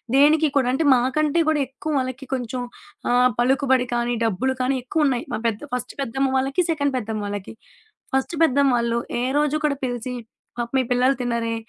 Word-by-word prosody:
దేనికి 305 +3 +5
కూడా 265 -3 +3
అంటే 270 +5 +1
మాకంటే 285 +6 +1
కూడా 310 -1 +2
ఎక్కువ 275 +4 -6
వాళ్ళకి 260 +1 -4
కొంచెం 250 -1 -3 0.5
ఆహ్, 250 +1 +4
పలుకుబడి 260 0 +3
కానీ, 240 0 0
డబ్బులు 230 +5 0
కానీ 260 +1 +1
ఎక్కువున్నాయి. 265 -2 0
మా - - -1
పెద్ద 220 -2 -2
ఫస్ట్ 250 - -3
పెద్దమ్మ 270 +1 -1
వాళ్ళకి, 270 +6 +1
సెకండ్ 285 -3 0
పెద్దమ్మ 220 -2 -3
వాళ్ళకి. 205 -1 -5 0.6
ఫస్ట్ 265 +5 0
పెద్దమ్మ 275 -4 +3
ఆళ్ళు 235 0 0 0.2
ఏ - - 0 0.2
రోజు 300 0 +1
కూడా 285 -2 +1
పిలిచి 245 0 -3 0.4
పాపం 240 +2 -3
మీ - - +4
పిల్లలు 250 +2 +3
తినరే 235 -2 -1
260 Hz, 170 wpm, -23 LUFS, 240-275 Hz, 0.6 s, దేనికి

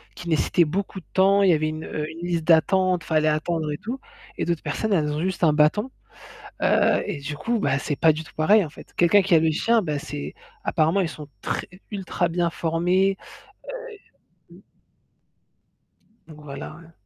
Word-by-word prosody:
qui 175 - -7
nécessitait 160 +3 +3
beaucoup 190 +4 -3
de - - -31
temps. 195 +1 +4
Il 195 - +5
y 175 - +6
avait 155 0 +1
une 155 0 -5
heu 150 +1 -4
une 165 +2 -7
liste 170 -2 -1
d'attente, 180 +2 +3
il - - -14
fallait 155 -1 +2
attendre 155 +1 0
et - - -4
tout 245 - -6 0.4
et - - -1
d'autres 170 -2 -2
personnes, 205 +8 -1
elles 150 -5 +1
ont 150 +1 -2
juste 185 0 -2
un 155 - +6
bâton, 155 +12 +2 0.7
heu, - - +3
et 200 -7 -3
du 140 +1 -5
coup, 230 +10 -1
bah, 140 -7 +1
c'est 140 +1 -3
pas 160 -1 +5
du 160 +2 -5
tout - - -16
pareil 200 +7 +4
en 160 - -6
fait. 145 - -15
Quelqu'un 175 +4 +5
qui 190 -2 +3
a - - +7
le 160 0 +2
chien, 230 +8 +2
bah 150 -5 -2
c'est 75 - -6 0.3
apparemment 165 +5 +2
ils 170 - -1
sont 150 -2 -9
très - - -3 0.2
ultra 185 -3 -1
bien 170 0 0
formés, 180 +4 +1 1.4
heu - - -14
mmh. - - -17 1.7
Donc 155 -2 -13
voilà, 145 +2 -8
heu 165 0 -18
165 Hz, 200 wpm, -24 LUFS, 155-190 Hz, 1.7 s, a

